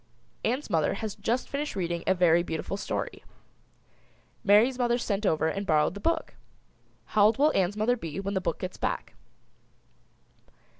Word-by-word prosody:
Ann's 255 +5 -1
mother 165 -4 +1
has 215 0 -4
just 245 +3 -2
finished 290 -1 -3
reading 170 -2 -2
a 190 - +4
very 175 -1 +4
beautiful 165 +2 -4
story. 200 - -4 1.2
Mary's 225 +6 +4
mother 240 -1 +2
sent 210 -3 -1
over 160 -1 +2
and 195 +5 -2
borrowed 155 0 +3
the 200 - -7
book. 330 +8 -1 0.8
How 210 -1 +5
old 215 +1 +4
will 300 +3 +3
Ann's 195 +2 +1
mother 225 +4 +2
be 165 -6 -6
when 200 +1 -3
the 190 - 0
book 170 - -2
gets 185 - -6
back? - - -3
200 Hz, 160 wpm, -28 LUFS, 175-235 Hz, 1.2 s, How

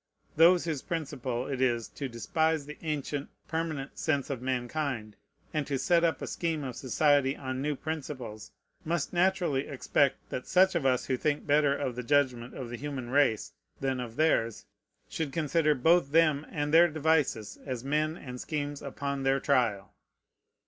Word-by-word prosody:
Those 170 +2 +6
whose 155 -5 -2
principle 130 -6 -3
it 135 -2 -3
is 120 -3 +1
to 140 -2 -5
despise 160 +6 0
the 150 +1 -9
ancient, 145 -2 -3 0.2
permanent 160 -3 -3
sense 140 -3 0
of 130 -3 -4
mankind, 125 -3 -2 0.4
and 150 -3 -1
to 140 -1 -1
set 170 +6 +3
up 165 -1 +1
a - - -1
scheme 165 -3 -2
of 130 -3 -5
society 140 +1 +2
on 130 -1 -4
new 150 +1 -1
principles, 130 -8 -6 0.3
must 170 -1 -2
naturally 175 -6 +1
expect 140 0 0
that 125 - -4
such 190 +1 +5
of 160 -6 +1
us 130 -1 +2
who 130 - 0
think 150 +2 -1
better 145 -1 +3
of 130 -3 -2
the 125 - -3
judgment 125 -2 +1
of 120 -3 -6
the 120 - -4
human 130 -2 -5
race 140 -6 +2 0.3
than, 135 -1 -1
of 120 -2 -6
theirs 115 -8 +1 0.4
should 160 -4 -3
consider 155 0 +2
both 160 +2 +3
them 155 -2 +3
and 150 -2 -2
their 170 +2 +8
devices 155 -8 0
as 130 -4 -4
men 155 +3 0
and 125 -5 -8
schemes 145 -2 -3
upon 140 0 -4
their 135 0 +2
trial. 120 -9 +1
140 Hz, 170 wpm, -29 LUFS, 130-155 Hz, 0.4 s, their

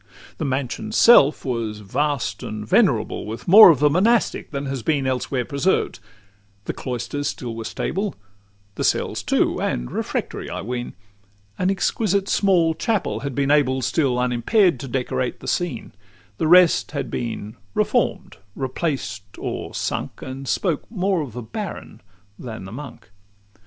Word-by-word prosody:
LXVI - - -22
The - - -1
mansion's 135 - -2
self 155 -13 +6
was 115 -4 -3
vast 130 0 -1
and 105 0 -6
venerable, - - +2
With 110 +2 -7
more 205 +3 +10
of 160 - +5
the 150 +3 +4
monastic 215 +8 +2
than 140 -1 -4
has 135 -2 -3
been 140 +3 0
Elsewhere 130 -1 -1
preserved: 140 - 0 0.7
the - - -3
cloisters 130 +3 -4
still 120 -4 -4
were 115 -1 -6
stable, 195 - -3 0.6
The - - -4
cells, - - 0
too, - - +1
and - - -2
refectory, - - -3
I - - -4
ween: 120 0 -4 0.6
An 185 - +2
exquisite 195 0 0
small 180 -6 +3
chapel 205 - -1
had 135 +1 -5
been 140 0 +1
able, 130 -3 +2
Still 135 -4 +1
unimpair'd, 125 - +2
to 135 - -6
decorate 125 0 -2
the - - -10
scene; 175 -10 -2 0.5
The 160 - +1
rest 180 -2 +5
had 140 - -3
been 110 -3 -4 0.2
reform'd, - - 0 0.2
replaced, 130 - -4
or - - -5
sunk, - - -3
And 135 +1 -7
spoke 170 -1 -1
more 190 -4 0
of 135 -7 -6
the 125 0 -6
baron 190 - -7 0.4
than 110 -6 -7
the 95 - -9
monk. 135 -5 -10
140 Hz, 150 wpm, -22 LUFS, 120-175 Hz, 0.7 s, more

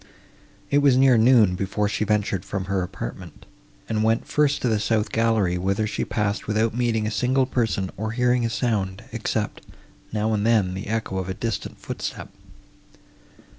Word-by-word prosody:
It 145 - +4
was 140 -3 +4
near 135 -1 +6
noon, 115 -4 +5
before 100 +3 -1
she 105 +1 -1
ventured 105 -3 0
from 95 -1 -4
her 95 0 -1
apartment, 90 -2 -7 0.4
and 110 -1 -1
went 115 +1 +1
first 145 -1 +2
to - - +2
the 110 -2 +2
south 105 0 0
gallery, 110 -6 +1
whither 100 +4 0
she 110 - -2
passed 105 -1 -2
without 110 +1 +1
meeting 115 -2 0
a 110 - -1
single 130 +4 +2
person, 115 -7 -1
or 110 +2 -3
hearing 125 0 +2
a 115 - 0
sound, 105 -6 -1
except, - - -2 0.5
now 110 +1 0
and 105 -1 0
then, 105 -5 +2
the 95 +2 -6
echo 110 -3 -2
of 95 0 -4
a 95 - -3
distant 115 -1 -4
footstep. - - -6
110 Hz, 170 wpm, -24 LUFS, 100-115 Hz, 0.5 s, near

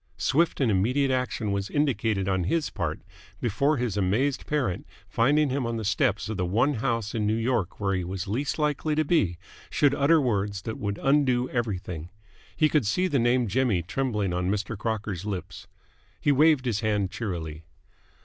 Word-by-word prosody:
Swift 160 - +1
and 130 -5 +2
immediate 125 +8 +2
action 125 -5 -1
was 100 0 -2
indicated 115 -9 0
on 95 -2 0
his 160 - 0
part 85 -6 -3 0.4
before 140 +7 +1
his 120 -4 -1
amazed 105 +8 0
parent, 135 -12 -1 0.2
finding 145 +4 +2
him 130 -2 -1
on 115 0 -2
the 110 - -4
steps 100 +1 +1
of 110 -2 -4
the 90 - 0
one 115 +10 +2
house 115 -3 -1
in 110 -3 0
New 110 - +2
York 115 -5 -1
where 100 -2 0
he 95 -1 -1
was 95 +1 -4
least 130 +8 -2
likely 150 0 0
to 155 0 +1
be, 105 - +2 0.3
should 145 -2 +3
utter 145 +4 +4
words 100 -7 -1
that 110 - -5
would 100 -1 -3
undo 135 -3 +3
everything. 90 -8 -3 0.5
He 155 - +4
could 150 -8 +1
see 180 - +1
the 145 -6 +1
name 120 0 +2
Jimmy 110 -4 +1
trembling 105 -2 -1
on 90 +1 -1
Mr. 105 +3 -2
Crocker's 105 -3 -3
lips. 100 -4 -5 0.5
He 145 - +2
waved 150 -1 +4
his 115 -4 0
hand 105 -4 0
cheerily. 80 -8 -5
115 Hz, 180 wpm, -26 LUFS, 100-135 Hz, 0.5 s, utter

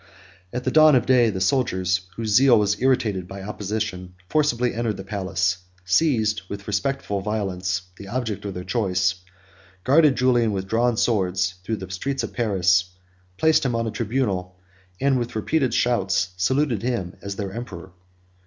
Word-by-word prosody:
At 125 - -4
the 130 - 0
dawn 155 -1 +7
of 125 - +2
day, 125 -3 +4
the 95 -3 -3
soldiers, 95 -4 0
whose 110 -1 -2
zeal 125 +1 +6
was 100 0 +1
irritated 110 -8 +1
by 95 0 -8
opposition, 100 -3 -4
forcibly 125 -6 +1
entered 115 -2 -2
the 95 - -7
palace, 95 -1 -1 0.3
seized, 110 - +2
with 100 0 -7
respectful 105 -1 -2
violence, 95 -3 -2
the 100 - -10
object 115 -3 -3
of 100 -2 -5
their 90 - -5
choice, 95 -2 0 0.6
guarded 145 +1 +5
Julian 120 -4 +2
with 95 -1 -3
drawn 115 +2 +1
swords 95 -5 +1
through 110 +4 -2
the 95 -2 -8
streets 135 +9 -2
of - - -5
Paris, 95 -5 +1 0.4
placed 160 0 +3
him 125 -3 0
on 115 0 0
the 110 - -2
tribunal, 105 -5 -2 0.4
and 135 -2 +2
with 120 -1 -4
repeated 130 +4 0
shouts 100 -5 +1
saluted 120 +4 +1
him 115 -8 -2
as 100 0 -5
their 100 -2 -5
emperor. 95 -6 -8
105 Hz, 160 wpm, -23 LUFS, 95-125 Hz, 0.6 s, dawn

